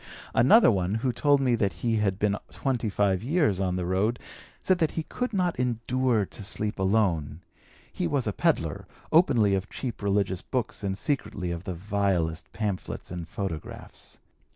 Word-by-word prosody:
"Another 135 - +6
one, 95 0 0
who 125 - +2
told 145 +1 +3
me 130 -2 +2
that 100 -5 +1
he 115 -1 +2
had 100 -3 +1
been 105 0 +1
twenty 125 -5 -1
five 100 -2 +1
years 135 - +1
on 90 -2 0
the 90 -1 -2
road, 100 +6 +1 0.4
said 185 -1 +1
that 160 -3 +3
he 160 - 0
could 250 +9 -3
not 180 - 0
endure 125 -2 +1
to 105 - -10
sleep 105 +1 -2
alone. 95 -6 +1 0.5
(He - - -1
was - - 0
a - - -1
pedlar, - - 0 0.2
openly 120 - +4
of 95 +1 -1
cheap 125 -5 -5
religious 100 -2 0
books 125 -4 -3
and 95 -1 -2
secretly 105 -9 -2
of 85 +1 -5
the 90 - -4
vilest 90 -3 -1
pamphlets 105 -6 -4
and 85 -2 -5
photographs). 90 -6 -7
105 Hz, 170 wpm, -27 LUFS, 95-125 Hz, 0.5 s, Another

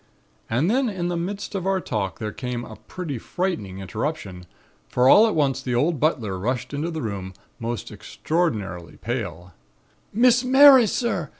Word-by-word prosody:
And 125 +8 +1
then 250 +4 +2
in 180 -4 -3
the 175 - -2
midst 195 +6 -4
of 190 -2 -3
our 195 -1 +2
talk 100 - -3
there 105 -1 -4
came 125 0 -5
a 110 - -10
pretty 145 - -6
frightening 165 - -3
interruption, 95 - -5 0.4
for 125 +1 +2
all 210 +11 +7
at 220 - -1
once 135 -4 +1
the 125 -2 -2
old 150 +5 +1
butler 115 - 0
rushed 125 +7 -3
into 150 +4 -2
the 160 -3 -4
room, 95 -3 -5 0.2
most 115 0 -4
extraordinarily 105 - -3
pale: 90 -8 -5 0.6
"'Miss 245 +3 +4
Mary, 265 -2 +8
sir! 195 - -1
135 Hz, 165 wpm, -23 LUFS, -, 0.6 s, Mary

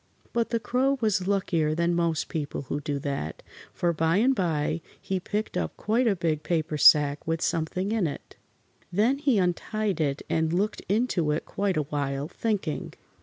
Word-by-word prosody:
But 235 -1 +1
the 230 - 0
Crow 260 +5 +1
was 205 -5 +1
luckier 170 -6 +1
than 170 +1 +1
most 170 -2 0
people 150 -3 -4
who 140 +2 -3
do 145 0 -2
that, 140 - -4 0.3
for 175 -1 0
by 165 +2 +2
and 250 +6 +4
by 165 - 0 0.2
he 190 -1 -2
picked 210 +4 -3
up 80 -2 -2
quite 235 +4 +1
a 205 - +3
big 160 -4 -1
paper 160 -2 -1
sack 145 0 +5
with 165 0 0
something 175 +5 -1
in 220 -6 +1
it. 145 - -8 0.6
Then 225 +9 +2
he 270 -6 +2
untied 195 +1 0
it 140 -2 -1
and 160 0 +1
looked 205 +4 0
into 200 -7 +1
it 150 +1 -1
quite 195 -3 -1
a 150 - +2
while, 140 -1 -2
thinking. 195 -4 -2
170 Hz, 175 wpm, -27 LUFS, 150-210 Hz, 0.6 s, sack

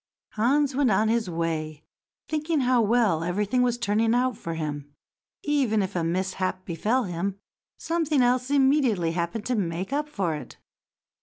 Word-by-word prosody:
Hans 270 +6 +2
went 275 -2 +3
on 215 +2 +2
his 225 -4 0
way, 160 -2 -3 0.4
thinking 310 0 0
how 250 -1 +3
well 215 -7 +2
everything 205 +8 0
was 245 -1 +1
turning 225 0 +1
out 250 -1 +1
for 165 -4 -5
him. 145 -2 -5 0.5
Even 260 -9 +1
if 190 +1 -5
a 170 - 0
mishap 185 +2 -2
befell 215 +9 0
him, 190 +1 -3 0.4
something 320 -5 +1
else 250 +1 +1
immediately 265 - +3
happened 170 +6 -3
to 250 - 0
make 185 +2 -2
up 295 +1 -1
for 190 - -1
it. 150 - -8
215 Hz, 155 wpm, -26 LUFS, 175-255 Hz, 0.5 s, went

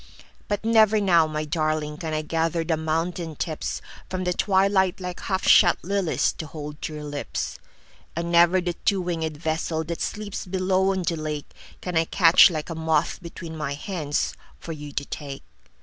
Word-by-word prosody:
But 205 +1 -2
never 220 -1 +5
now, 170 -5 +4
my 155 0 -3
darlingCan 155 0 -1
I 155 0 -1
gather 165 +1 0
the 160 0 +1
mountain 160 +1 -2
tipsFrom 180 +3 -5
the 180 - +1
twilight 190 -1 +2
like 180 -1 -5
half 190 -2 -2
shut - - +6
liliesTo 180 -3 0
hold 150 0 -8
to 155 - -4
your 150 - -6
lips. 145 - -4 0.6
And 170 +1 -2
never 175 +2 +6
the 175 -1 -2
two 200 +2 0
winged 160 -4 -3
vesselThat 160 +1 -2
sleeps 210 -3 -4
below 190 +1 +2
on 190 -1 -1
the 165 -1 -1
lakeCan 155 +3 -6
I 165 - +2
catch 170 +1 +7
like 160 -1 -4
a - - -1
moth 160 0 0
between 170 -1 -8
my 150 -2 -3
handsFor 160 0 -4
you 150 -1 -8
to 140 - -3
take. 140 -2 -7
165 Hz, 160 wpm, -25 LUFS, 155-185 Hz, 0.6 s, catch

